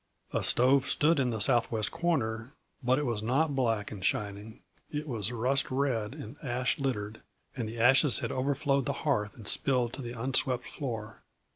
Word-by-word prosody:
A - - +1
stove 130 +2 +4
stood 155 +1 +3
in 130 -2 +1
the 115 -2 -2
southwest 110 0 +2
corner, 125 -8 -1 0.3
but 125 +1 +2
it 150 - -1
was 115 -4 -2
not 140 +7 +1
black 115 -6 0
and 100 -4 -8
shining; 105 +3 -3 0.3
it 150 +1 -4
was 115 -5 -2
rust 130 +4 +1
red 130 -5 -1
and 115 +7 -9
ash 125 -1 -1
littered, 110 -6 -3 0.3
and 115 -4 -3
the 115 - -8
ashes 130 +4 +6
had - - -1
overflowed 140 +1 0
the 140 - 0
hearth 105 -8 0
and 110 -4 -11
spilled 125 -1 +1
to - - -6
the 120 -1 -7
unswept 130 0 0
floor. 115 -5 -6
125 Hz, 175 wpm, -30 LUFS, 110-135 Hz, 0.3 s, ashes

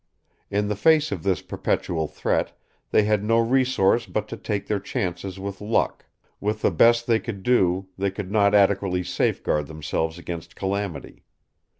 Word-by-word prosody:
In 105 +1 0
the 105 - -1
face 155 +6 +3
of 90 - -3
this 95 +1 0
perpetual 80 -3 -1
threat, - - -1 0.3
they 110 - +4
had 105 -1 +1
no 115 +2 +2
resource 120 -3 +2
but 105 0 -2
to - - -5
take 105 -2 -3
their 105 -1 -1
chances 95 -1 -4
with 100 +1 -6
luck; 105 +2 0 0.3
with 105 +1 -2
the - - +4
best 115 +7 +4
they 115 -2 +3
could 100 -6 -6
do, 95 -6 +2
they 100 0 +1
could 100 0 -6
not 100 -1 +4
adequately 100 -2 +3
safeguard 75 -4 0
themselves 80 +1 -3
against 85 -1 -7
calamity. 95 -5 -4
100 Hz, 165 wpm, -24 LUFS, 90-110 Hz, 0.3 s, they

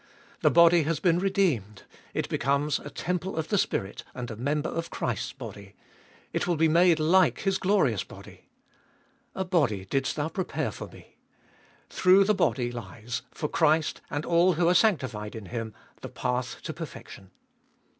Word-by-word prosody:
The - - +4
body 170 0 +6
has 155 0 -1
been 175 -2 +2
redeemed; 165 - 0 0.3
it - - -1
becomes 140 +3 0
a 145 - -9
temple 180 +5 -3
of 160 -1 -3
the 205 - +2
Spirit 100 - -2
and 125 -2 -5
a - - -5
member 145 +6 -1
of 165 0 -4
Christ's 120 +2 -3
body; 105 -6 -10 0.6
it - - -1
will 175 - +2
be 160 +1 +3
made 170 +1 +4
like 175 +4 +3
His 195 -1 0
glorious 180 - +2
body. - - -14 0.9
A 190 - -2
body 145 - +1
didst 135 +6 -1
thou 150 0 -1
prepare 185 +2 -3
for - - -8
Me: - - -17 0.7
through 185 +2 +5
the 210 +2 +2
body 125 -10 0
lies, 120 0 -6
for 150 - -4
Christ 155 0 +1
and 145 +3 -3
all 175 +2 +4
who 170 +1 +1
are 175 - +5
sanctified 130 - +1
in 110 -3 -7
Him, 115 +1 -5 0.3
the - - -7
path 125 0 -3
to - - -4
perfection. 95 -2 -9
150 Hz, 165 wpm, -27 LUFS, 120-175 Hz, 0.9 s, body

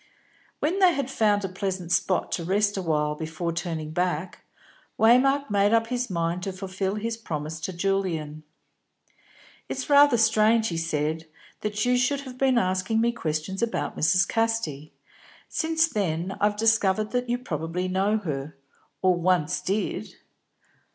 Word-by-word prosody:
When 345 +6 -1
they 365 -3 +5
had 270 -2 -2
found 205 -4 +2
a - - -1
pleasant 185 -2 -4
spot 185 0 +1
to 170 - -2
rest 205 +4 +1
awhile 155 -5 0
before 160 +2 -4
turning 165 -3 -4
back, 180 +1 -2 0.6
Waymark 270 +4 +4
made 205 +2 +3
up 225 0 +2
his 250 -1 -2
mind 170 0 -1
to 195 - -3
fulfil 190 +1 -3
his 225 +2 -3
promise 155 -7 -5
to 190 - -4
Julian. 170 -5 -2 1.3
"It's 270 +2 -4
rather 285 -3 +7
strange," 220 0 +3
he 170 - -4
said, 160 0 -2 0.3
"that 210 +1 -2
you 250 0 +3
should 275 +3 +1
have 255 -2 -10
been 265 -2 +3
asking 190 +1 +1
me 235 +1 +2
questions 165 -2 -3
about 235 -1 -2
Mrs. 185 +4 +3
Casti. 225 -11 -1 0.6
Since 320 0 +1
then 190 - -2
I've 205 0 +2
discovered 215 -2 +2
that 250 -1 -1
you 245 - +1
probably 170 - -3
know 195 +3 +1
her, 150 -6 -5 0.5
or 185 -1 +5
once 175 -1 +1
did." 200 +3 -2
195 Hz, 150 wpm, -25 LUFS, 170-230 Hz, 1.3 s, rather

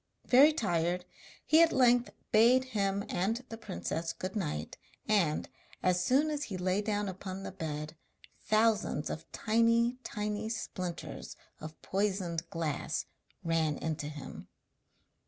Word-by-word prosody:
Very 275 +5 +7
tired, 180 - 0 0.4
he 315 +2 +6
at 335 - +6
length 245 -2 +4 0.2
bade 240 +4 +6
him 200 -1 0
and 225 +8 -1
the 225 - -5
princess 160 - -3
good 185 +2 -5
night 150 - -3 0.3
and, 180 -8 +2 0.4
as 180 -1 +2
soon 280 +9 +3
as 295 -1 -2
he 195 - -5
lay 185 +2 +1
down 205 -1 -1
on 190 0 -5
the - - -5
bed, 155 -3 -5 0.5
thousands 215 -8 +2
of 160 - -7
tiny, 230 +2 +2
tiny 210 0 -3
splinters 185 -6 -5 0.2
of 155 +1 -9
poisoned 190 -4 -1
glass 160 -4 -2 0.4
ran 160 -3 +1
into 155 -2 -3
him. 150 -2 -8
195 Hz, 130 wpm, -31 LUFS, 165-230 Hz, 0.5 s, Very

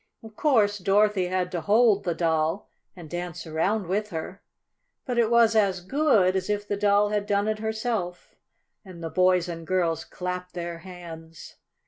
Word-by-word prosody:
Of 220 -1 -12
course 215 -9 +2
Dorothy 195 0 +2
had 180 0 -1
to 175 - -3
hold 205 +2 +3
the 170 -2 -1
Doll 160 +2 0 0.2
and 175 -3 -10
dance 175 +1 -5
around 185 +6 0
with 205 +4 -1
her, 180 +2 -6 0.6
but 245 -2 -1
it 225 -2 +3
was 235 -1 +4
as 195 -4 +2
good 205 -4 +2
as 190 +1 -2
if 205 0 -1
the 205 - -1
Doll 205 0 +3
had 205 -1 -1
done 205 0 +1
it 215 0 -1
herself, 220 -5 -3 0.5
and 180 -4 -11
the 165 - -4
boys 185 -1 +3
and 165 -2 -7
girls 170 -3 0
clapped 180 0 -6
their 170 -1 -5
hands. 165 -3 -11
185 Hz, 170 wpm, -26 LUFS, 175-210 Hz, 0.6 s, was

